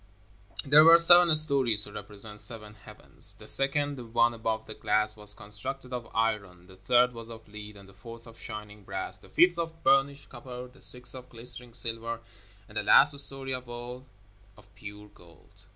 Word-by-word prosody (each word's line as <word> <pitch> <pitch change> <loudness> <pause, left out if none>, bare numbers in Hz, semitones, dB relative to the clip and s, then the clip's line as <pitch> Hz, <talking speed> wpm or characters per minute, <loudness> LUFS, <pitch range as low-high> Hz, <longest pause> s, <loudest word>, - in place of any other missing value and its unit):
There 150 +2 +6
were 165 +1 +7
seven 175 -1 +5
stories 135 -9 +4
to 105 - -1
represent 105 +1 -10
seven 105 -3 -1
heavens. 105 - +1
The - - -16
second, 145 +1 +2
the 125 - -10
one 120 +1 0
above 110 -1 -5
the 110 - -7
glass, 105 0 -2
was 105 -1 -1
constructed 125 +6 -6
of 120 -2 -8
iron, 100 -6 -4
the 95 +1 -18
third 125 +6 0
was 115 -1 -12
of 115 -1 -14
lead, 105 0 -12
the 95 - -19
fourth 115 +4 -14
of 115 -1 -17
shining 105 -2 -11
brass, - - -6
the 95 - -20
fifth 175 - +2
of 165 -1 -7
burnished 140 +1 0
copper, 125 0 -11
the 130 +1 -23
sixth 125 -1 -2
of 130 -1 -13
glistening 120 0 -5
silver, 115 0 -3 0.5
and 105 0 -7
the - - -5
last 140 +7 +5
story 135 -1 +2
of 125 -1 -6
all, 120 +2 -8 0.5
of 105 - -23
pure 105 0 -13
gold. 85 -4 -23
115 Hz, 185 wpm, -26 LUFS, 105-130 Hz, 0.5 s, were